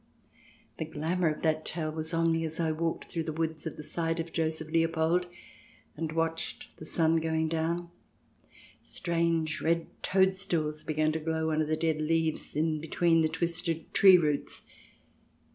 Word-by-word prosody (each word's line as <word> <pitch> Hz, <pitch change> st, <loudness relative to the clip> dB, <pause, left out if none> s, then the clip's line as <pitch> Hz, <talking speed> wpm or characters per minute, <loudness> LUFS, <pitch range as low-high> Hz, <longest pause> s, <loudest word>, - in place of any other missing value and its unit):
The 160 Hz, -, -1 dB
glamour 160 Hz, +3 st, -1 dB
of 155 Hz, -, -4 dB
that 155 Hz, -1 st, +1 dB
tale 155 Hz, -1 st, -3 dB
was 160 Hz, +1 st, -2 dB
on 165 Hz, 0 st, +2 dB
me 165 Hz, 0 st, +1 dB
as 160 Hz, 0 st, -1 dB
I 160 Hz, -1 st, +1 dB
walked 165 Hz, +1 st, -2 dB
through 165 Hz, -, -3 dB
the 160 Hz, -, -2 dB
woods 160 Hz, 0 st, -3 dB
at 155 Hz, -, -6 dB
the 150 Hz, -, -7 dB
side 165 Hz, +1 st, -2 dB
of 165 Hz, 0 st, -4 dB
Joseph 160 Hz, -1 st, -2 dB
Leopold, 165 Hz, +2 st, +2 dB, 0.7 s
and 160 Hz, 0 st, -3 dB
watched 165 Hz, 0 st, -2 dB
the 155 Hz, -, -9 dB
sun 160 Hz, 0 st, +2 dB
going 160 Hz, 0 st, 0 dB
down. 170 Hz, +2 st, -1 dB, 0.9 s
Strange 165 Hz, -2 st, 0 dB
red 165 Hz, 0 st, +1 dB, 0.2 s
toadstools 185 Hz, -5 st, +1 dB
began 155 Hz, 0 st, +1 dB
to 160 Hz, -, -2 dB
glow 160 Hz, 0 st, -1 dB
under 155 Hz, 0 st, +1 dB
the 155 Hz, 0 st, 0 dB
dead 160 Hz, -1 st, 0 dB
leaves 160 Hz, 0 st, 0 dB
in 155 Hz, 0 st, 0 dB
between 165 Hz, +1 st, +2 dB
the 160 Hz, -, +2 dB
twisted 165 Hz, 0 st, -2 dB
tree 190 Hz, -2 st, +8 dB
roots. 150 Hz, -4 st, -1 dB
160 Hz, 160 wpm, -30 LUFS, 155-165 Hz, 0.9 s, tree